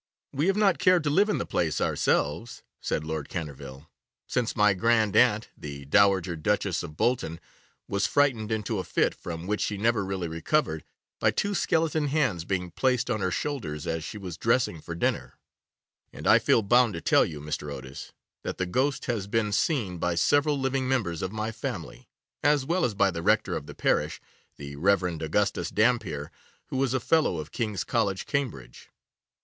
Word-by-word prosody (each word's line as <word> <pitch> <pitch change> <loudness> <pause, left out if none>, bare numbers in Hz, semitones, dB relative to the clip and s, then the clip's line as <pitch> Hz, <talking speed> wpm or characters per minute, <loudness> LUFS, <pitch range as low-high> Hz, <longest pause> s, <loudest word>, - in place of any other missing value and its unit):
'We 145 +5 0
have 195 +1 +2
not 200 -4 +3
cared 180 -3 +4
to 150 - 0
live 200 +7 +3
in 210 - +1
the - - -2
place 80 -3 -1
ourselves,' 85 +11 0 0.2
said 75 - -2
Lord 80 -2 -4
Canterville, 70 -3 -7 0.4
'since 125 -2 -1
my 105 -2 +4
grandaunt, 110 +1 +3
the 70 -1 -8
Dowager 95 +1 +3
Duchess 95 +1 0
of 75 -3 -9
Bolton, 115 -10 0 0.5
was 100 0 0
frightened 125 -7 +1
into 110 -1 -1
a - - -2
fit, - - +1
from 85 0 -7
which 105 +2 -1
she 105 - -1
never 115 0 +1
really 95 -2 -3
recovered, 80 - 0 0.4
by 110 - +3
two 205 - -1
skeleton 160 -4 +1
hands 125 - 0
being 90 -2 -2
placed 125 -2 +1
on 110 -3 -1
her 95 - +1
shoulders 85 - -3
as 80 -1 -2
she 105 - -6
was 90 -5 -7
dressing 115 -8 +1
for 85 - -6
dinner, 85 - -2 0.7
and - - -10
I - - +7
feel 115 - +3
bound 120 0 +4
to 85 - -5
tell - - +4
you, 75 - -5
Mr. 75 0 -4
Otis, 65 -1 -8 0.3
that - - -5
the 95 - -1
ghost 130 +10 0
has 110 -5 -2
been 105 0 0
seen 100 - 0
by 85 0 0
several 145 - +2
living 135 -1 0
members 100 -11 0
of 95 - -3
my 110 +1 -3
family, 110 - -6 0.3
as 145 -2 +3
well 175 +5 +1
as 110 -4 -2
by 100 -1 +3
the 85 - -4
rector - - +2
of - - -5
the - - -9
parish, - - 0 0.4
the 70 0 -8
Rev. 95 +4 +3 0.2
Augustus 80 +6 0
Dampier, 105 -10 0 0.4
who 135 0 0
is 130 -1 0
a - - +2
Fellow 160 +6 +2
of 75 -2 -6
King's 105 -6 -2
College, 100 -5 0
Cambridge. 140 -4 -4
105 Hz, 185 wpm, -27 LUFS, 85-130 Hz, 0.7 s, I